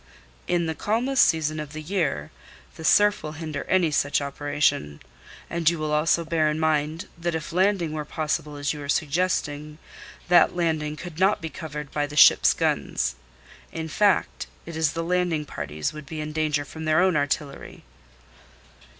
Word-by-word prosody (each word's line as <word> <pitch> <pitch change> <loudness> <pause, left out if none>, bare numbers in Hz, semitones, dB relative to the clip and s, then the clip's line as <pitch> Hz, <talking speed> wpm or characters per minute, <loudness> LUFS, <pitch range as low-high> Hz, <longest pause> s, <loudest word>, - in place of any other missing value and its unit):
"In 175 -1 +1
the 160 - -2
calmest 240 - +2
season 155 -1 +1
of 150 -1 -7
the 155 - -6
year, 155 - -2 0.4
the 160 - -9
surf 205 +5 +4
will 155 - -6
hinder 155 -2 -5
any 180 -4 +2
such 145 0 +1
operation. 140 - -1 0.5
And 170 -2 +2
you 170 - -2
will 155 -1 -3
also 165 +2 +2
bear 160 -1 +1
in 150 +1 -2
mind 155 +1 0
that 170 0 -2
if 160 0 -5
landing 185 -3 +1
were 155 -1 -3
possible 150 0 -3
as 145 +1 -2
you 150 - -8
are 140 - -8
suggesting, 150 -1 -1 0.5
that 175 0 +5
landing 155 -3 -1
could 165 +1 -9
not 195 +2 +3
be 160 - -5
covered 150 -2 -7
by 145 -1 -1
the 145 +1 -9
ships' - - +7
guns. - - 0 0.6
In 160 -1 -5
fact, 200 +5 +1 0.2
it 170 - -8
is 160 -2 +1
the 165 - -3
landing 175 -3 0
parties 75 - -4
would 150 -2 -10
be 160 +1 -6
in 150 0 -5
danger 150 -2 0
from 160 +3 -8
their 155 +1 +3
own 185 -1 +3
artillery." 145 0 -3
155 Hz, 175 wpm, -25 LUFS, 150-170 Hz, 0.6 s, ships